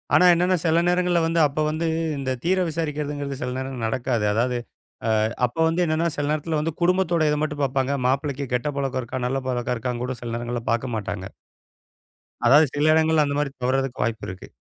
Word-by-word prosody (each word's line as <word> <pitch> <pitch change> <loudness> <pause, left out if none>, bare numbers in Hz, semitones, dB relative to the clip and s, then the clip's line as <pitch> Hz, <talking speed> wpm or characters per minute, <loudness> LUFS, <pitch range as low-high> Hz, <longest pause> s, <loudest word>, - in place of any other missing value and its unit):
ஆனா 180 - +6
என்னன்னா 180 +2 +2
சில 165 0 +3
நேரங்கள்ல 180 -1 +2
வந்து 165 +1 +1
அப்ப 145 +2 -5
வந்து 160 +2 -1 0.3
இந்தத் 130 -2 -3
தீர 185 +2 +2
விசாரிக்கிறதுங்கறது 150 -3 -3
சில 125 - -2
நேரம் 130 -2 -4
நடக்காது. 120 -1 -1
அதாது, 120 +3 +1 0.7
அ - - +2 0.2
அப்போ 125 +7 -6
வந்து 170 +2 +1
என்னன்னா, 160 +1 +1
சில 145 - -1
நேரத்துல 155 +1 -1
வந்து 160 +1 -2
குடும்பத்தோட 175 -3 +2
இத 150 - 0
மட்டும் 150 -1 -2
பாப்பாங்க. 135 0 0
மாப்பிள்ளைக்கு 140 +1 -1
கெட்ட 125 +4 0
பழக்கம் 135 -2 -1
இருக்கா, 125 +1 -4
நல்ல 135 +2 -1
பழக்கம் 125 0 -1
இருக்கான்னு 120 +1 -3
கூடச் 130 -1 -4
சில 120 -1 -4
நேரங்கள்ல 120 0 -3
பாக்கமாட்டாங்க. 110 -5 -3 1.2
அதாது 145 +6 +7
சில 150 +2 +3
இடங்கள்ல 160 -1 +3
அந்த 140 0 -2
மாரி 150 -1 0
தவறுறதுக்கு 130 0 0
வாய்ப்பு 115 -1 -2
இருக்கு. 95 0 -9
140 Hz, 180 wpm, -24 LUFS, 125-160 Hz, 1.2 s, அதாது